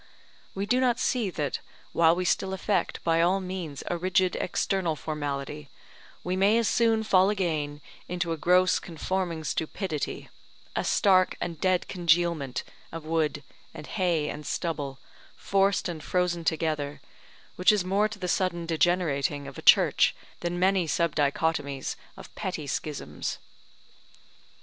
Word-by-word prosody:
We 195 +1 -2
do 245 +5 +2
not 250 -2 +2
see 235 -6 +1
that, 150 -6 -2 0.3
while 165 0 +5
we 180 +1 -2
still 190 +2 +1
affect 195 +1 -1
by 165 0 +3
all 180 +3 +3
means 180 -6 -5
a 175 - -2
rigid 185 0 +2
external 180 -3 0
formality, 145 -1 -4 0.5
we 180 +1 -1
may 200 +4 +4
as 230 -2 +2
soon 225 -1 +3
fall 190 -2 +4
again 155 -7 -1 0.3
into 175 -1 -2
a 165 - -1
gross 180 +3 +4
conforming 170 0 -3
stupidity, 155 +1 -3 0.5
a - - 0
stark 185 -2 +3
and 165 -3 -5
dead 185 -1 +2
congealment 170 -6 +1 0.3
of 165 -1 -7
wood 155 -3 0 0.3
and 155 -2 -8
hay 175 -6 0
and 150 0 -6
stubble, 145 -6 -3 0.4
forced 195 0 +1
and 165 -4 -5
frozen 180 -1 0
together, 155 -3 -1 0.6
which 180 - +5
is 205 -4 +1
more 200 +3 +2
to 215 - -8
the 185 -2 -4
sudden 175 -1 0
degenerating 160 -4 +1
of 140 - -9
a - - -7
Church - - +5 0.2
than 175 0 -2
many 185 -1 +2
subdichotomies 150 -3 0 0.2
of - - -12
petty 170 -5 -4
schisms. 145 +1 -4
170 Hz, 140 wpm, -27 LUFS, 155-185 Hz, 0.6 s, while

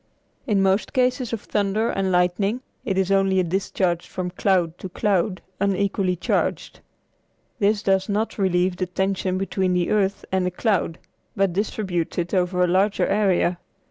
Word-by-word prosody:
In 200 -4 +2
most 195 +2 +1
cases 250 -2 +1
of 230 -3 -3
thunder 210 +2 0
and 195 -1 -1
lightning 185 +6 +1 0.2
it 195 -4 -1
is 190 0 +1
only 195 -1 +3
a - - +3
discharge 180 -1 -1
from 180 -1 -4
cloud 180 -3 +1
to 190 - -6
cloud 190 0 0 0.2
unequally 195 -1 +1
charged. 175 - -1 0.8
This 205 0 +2
does 190 +1 +1
not 210 +2 -1
relieve 180 -1 +1
the 185 - -2
tension 190 0 -1
between 190 -1 0
the 180 -1 0
earth 200 -2 +1
and 190 -1 +1
the 180 - +1
cloud, 180 -3 0 0.4
but 195 -2 +1
distributes 190 -3 -2
it 175 0 -2
over 180 -1 +2
a - - +3
larger 195 +4 +2
area. 190 -4 +1
190 Hz, 160 wpm, -23 LUFS, 180-200 Hz, 0.8 s, only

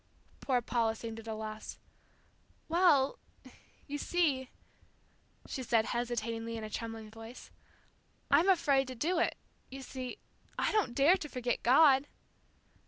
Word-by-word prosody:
Poor 250 -3 0
Paula 230 -2 0
seemed 225 0 -7
at 225 - -12
a 220 - -3
loss. 215 0 -7 0.9
"Well, 320 -5 +3 0.7
you 290 0 -5
see," 285 -8 0 1.0
she 265 - -5
said, 230 -3 +2
hesitatingly 230 -1 -3
in 220 - -6
a 215 - -6
trembling 225 -1 -6
voice, 225 +2 -11 0.8
"I'm 320 +7 +5
afraid 280 -7 +3
to 255 - -6
do 335 +8 0
it. - - 0 0.3
You 270 0 -8
see, 255 -1 -6 0.4
I - - +1
don't 405 - +1
dare 305 +7 +5
to 300 -5 -7
forget 245 -2 -2
God." 270 +2 +5
255 Hz, 135 wpm, -32 LUFS, 225-285 Hz, 1.0 s, I'm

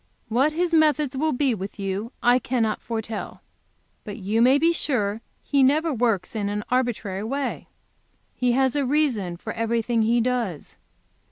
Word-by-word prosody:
"What 260 +7 +2
His 340 +1 0
methods 300 -3 +3
will 310 +4 +1
be 265 -1 +1
with 195 -1 -6
you 200 +4 -3
I 245 +1 +5
cannot 235 -4 -1
foretell. 225 -1 -5 0.6
But 205 0 -7
you 210 +2 0
may 255 +3 +6
be 330 +3 +3
sure 235 -11 0
that - - -17 0.2
He 280 -1 +1
never 300 +4 +3
works 230 -5 0
in 205 -2 -1
an 210 0 -3
arbitrary 225 -6 -1
way. 275 +5 -3 0.7
He 250 -1 +1
has 265 +1 +2
a 290 - +1
reason 250 - 0
for - - -6
everything 230 0 0
He 230 +2 +3
does. 235 - -2
240 Hz, 165 wpm, -24 LUFS, 215-275 Hz, 0.7 s, may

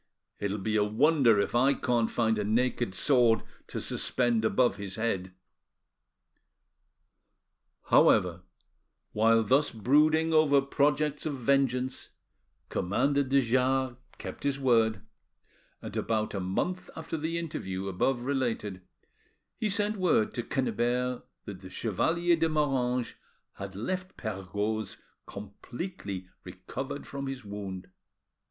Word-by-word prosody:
It'll 100 0 -2
be 110 +2 -1
a 105 - +4
wonder 120 +1 +4
if 100 - 0
I 130 +4 +4
can't 120 -3 +1
find 110 -2 +1
a - - 0
naked 120 -1 0
sword 120 -4 +3 0.2
to - - -4
suspend 120 -3 0
above 125 +2 +2
his 100 -2 -5
head." 95 -5 -2 2.6
However, 90 -1 +4 0.7
while 115 +1 +4
thus 135 +7 +3
brooding 155 +8 +3
over 155 -3 +5
projects 145 +2 +1
of 145 - -2
vengeance, 130 0 0 0.6
Commander 140 +10 +1
de 135 0 +3
Jars 130 +1 +1 0.2
kept - - -8
his 140 -1 0
word, 115 -6 +2 0.8
and - - -7
about 110 -1 -1
a 100 - -2
month 100 - -2
after 160 0 -5
the 160 +2 -2
interview 95 - -4
above 120 +7 0
related 120 -8 -2 0.8
he 215 - 0
sent 205 +1 0
word 175 - +2
to 120 - -2
Quennebert 125 0 -1 0.2
that 100 -3 -8
the 95 - -10
Chevalier 165 - +1
de 165 0 +1
Moranges 130 -5 0 0.4
had 95 -1 -8
left 185 - -4
Perregaud's 105 +1 -3 0.3
completely 100 - -7 0.2
recovered 115 +10 -6
from 140 0 -5
his 135 -4 -6
wound. 95 -2 -7
125 Hz, 120 wpm, -29 LUFS, 105-140 Hz, 2.6 s, over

